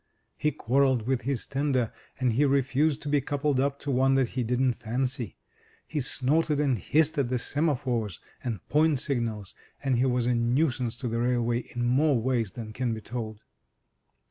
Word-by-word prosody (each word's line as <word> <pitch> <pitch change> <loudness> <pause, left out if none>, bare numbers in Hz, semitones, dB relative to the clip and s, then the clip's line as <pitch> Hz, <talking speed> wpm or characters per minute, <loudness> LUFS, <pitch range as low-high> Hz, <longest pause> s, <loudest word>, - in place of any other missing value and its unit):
He 150 - 0
quarrelled 130 -2 +2
with 130 0 0
his 130 0 -2
tender, 135 -4 0 0.3
and 125 -3 +2
he 135 +6 +3
refused 140 +2 +2
to - - -6
be 145 -1 +2
coupled 145 0 0
up 140 +1 +1
to 145 - -2
one 135 +1 +3
that 130 -3 +2
he 130 - -2
didn't 125 +2 +1
fancy. 120 -1 -3 0.5
He 150 -2 -2
snorted 145 +4 +1
and 135 -6 +1
hissed 155 - +2
at 130 -4 +1
the 125 - +1
semaphores 125 - -1 0.2
and 115 -6 -4
point 155 0 +3
signals, 115 -7 -2 0.3
and 135 -3 +2
he 125 - +3
was 125 -1 +1
a 125 - +2
nuisance 120 0 +1
to 125 - -4
the 115 0 -1
railway 120 -1 +1
in 120 0 -4
more 135 +2 +3
ways 115 -4 0
than 110 -2 -7
can 120 -1 -1
be 110 - -7
told. 110 -2 -6
130 Hz, 180 wpm, -27 LUFS, 120-140 Hz, 0.5 s, he